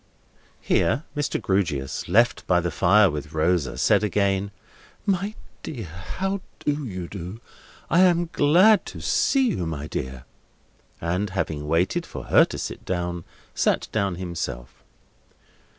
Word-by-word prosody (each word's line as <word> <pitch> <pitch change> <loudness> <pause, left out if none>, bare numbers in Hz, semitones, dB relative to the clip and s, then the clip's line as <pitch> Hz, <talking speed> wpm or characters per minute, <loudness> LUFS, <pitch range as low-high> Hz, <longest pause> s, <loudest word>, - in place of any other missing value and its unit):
Here 140 +7 +1
Mr. 145 -1 -1
Grewgious, 85 -9 -1
left 115 +5 +3
by 90 -1 +4
the 85 0 -2
fire 95 +5 +4
with 75 0 -6
Rosa, 80 -1 +1
said - - +3
again: 100 -1 +1 0.6
"My 200 +1 0 0.3
dear, 120 -9 -6 0.3
how 195 0 -1 0.2
do 145 0 -2
you 90 -4 -5
do? 95 +3 -7 0.5
I 170 - +3
am 175 -2 +4
glad 180 +8 +5
to - - -8
see 265 -3 +2
you, 90 - -2
my 75 -2 -4
dear." 65 -3 -5 0.7
And 90 +5 -1
having 80 -6 -3
waited 90 - +1
for - - -7
her - - +5
to - - -7
sit - - -5
down, 85 -2 -3 0.3
sat - - +1
down 100 -4 0
himself. 85 -9 -5
95 Hz, 135 wpm, -24 LUFS, -, 0.7 s, glad